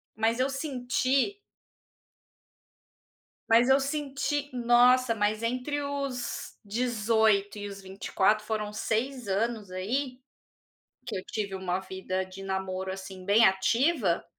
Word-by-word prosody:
mas 225 +2 +1
eu 260 +2 +2
senti 270 +5 0 2.1
mas 235 +3 +5
eu 270 +1 +6
senti 285 0 -2
nossa, 245 0 +4
mas 215 +1 0
entre 255 +5 -1
os 275 -4 -4
18 220 -2 +1
e 205 - -5
os 200 -1 -8
24, 195 +2 0
foram 210 -1 -3
6 245 +3 -2
anos 210 +1 -1
aí, 250 +8 -2 0.9
que - - -3
eu 185 - -4
tive 205 -3 -4
uma 185 -1 -1
vida 190 0 -3
de 185 +1 -10
namoro, 190 -1 -3
assim, 190 -1 -8
bem 210 +4 +5
ativa, 210 - +2
225 Hz, 115 wpm, -28 LUFS, 195-255 Hz, 2.1 s, eu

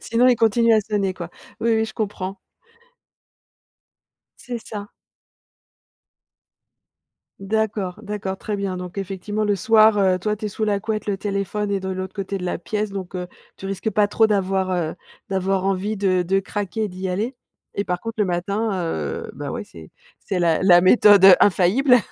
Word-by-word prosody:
sinon 235 +2 +2
il 250 - +5
continue 230 +1 +3
à 220 - +5
sonner 200 -3 -1
quoi. 170 -2 -7 0.3
Oui, 230 0 +2
oui 220 - +1
je 220 - -7
comprends. 195 -3 -4 2.0
C'est 245 -2 -6
ça. 205 -1 -7 2.5
D'accord, 205 -2 -2
d'accord, 205 -2 -4
très 205 +2 -4
bien. 195 -2 -3
Donc 180 +1 -8
effectivement, 200 +2 -3
le 205 -1 +1
soir, 215 +2 +5
heu, 185 -2 +3
toi, 210 +3 -1
tu 215 0 -6
es - - 0
sous 210 +2 -4
la 205 -2 +1
couette, 215 +1 -3
le 200 -2 -1
téléphone 200 +1 -2
est 200 -1 0
de 190 - -6
l'autre 185 +1 -5
côté 195 0 -4
de - - -6
la 180 - -2
pièce, 210 +4 -3
donc 195 -2 -6
heu, 180 0 -4 0.3
tu 195 - -7
risques 195 +3 -3
pas 210 -1 +3
trop 220 +2 +3
d'avoir, 190 -2 0
heu, 175 -3 -1 0.3
d'avoir 190 0 0
envie 195 +2 -1
de 185 -2 +1
de 195 +3 +1
craquer 205 +2 -3
et - - -3
d'y 185 0 -5
aller 220 +8 -2 0.4
et - - +2
par 180 -3 -2
contre, 225 0 -5
le 210 - +2
matin, 200 +5 -1
heu, 80 - -3
bah, - - -5
ouais - - -4
c'est 80 -2 -14 0.3
c'est 190 - -3
la 170 0 +2
la 175 -2 +7
méthode, 200 0 +6
heu, 190 -2 +10
infaillible. 210 +8 +4
200 Hz, 180 wpm, -22 LUFS, 185-215 Hz, 2.5 s, heu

